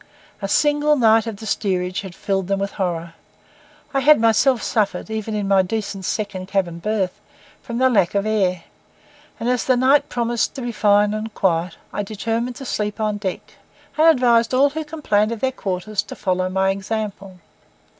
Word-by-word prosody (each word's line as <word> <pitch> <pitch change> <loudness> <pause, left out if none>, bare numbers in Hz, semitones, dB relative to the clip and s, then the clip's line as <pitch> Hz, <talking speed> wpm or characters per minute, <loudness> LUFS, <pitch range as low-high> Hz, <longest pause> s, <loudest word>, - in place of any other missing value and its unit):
A 195 - -2
single 295 +5 +3
night 225 -3 +4
of 220 -3 -5
the 220 - -9
steerage 185 -3 -1
had 190 -3 -9
filled 195 -2 -2
them 195 0 0
with 200 0 -2
horror. 170 -3 -3 0.8
I 275 - +2
had 295 +1 +6
myself 230 +2 +3
suffered, 215 0 -1
even 220 0 -3
in 205 -2 -2
my 195 -1 +4
decent 195 0 -4
second 200 -4 -3
cabin 180 -4 -1
berth, 200 -1 -2 0.4
from 235 - -5
the 260 +1 +4
lack 205 -7 +2
of 200 0 +1
air; 190 -5 0 0.8
and 230 - -3
as 250 -1 +1
the 255 -1 +2
night 275 +3 +3
promised 235 +1 -1
to 270 - -5
be 240 - -3
fine 210 -1 +3
and 215 +1 -4
quiet, 170 -2 0 0.2
I - - -1
determined 225 +4 -3
to 270 - -8
sleep 210 -3 -3
on 215 -1 0
deck, 195 -3 -6 0.4
and 315 +1 +4
advised 245 -5 +4
all 280 +2 +4
who 315 +2 -4
complained 255 -9 0
of 230 - -7
their 260 +3 0
quarters 200 -2 -3
to 210 - -10
follow 185 -1 -1
my 190 +1 +1
example. 195 -1 -5
215 Hz, 185 wpm, -21 LUFS, 195-240 Hz, 0.8 s, had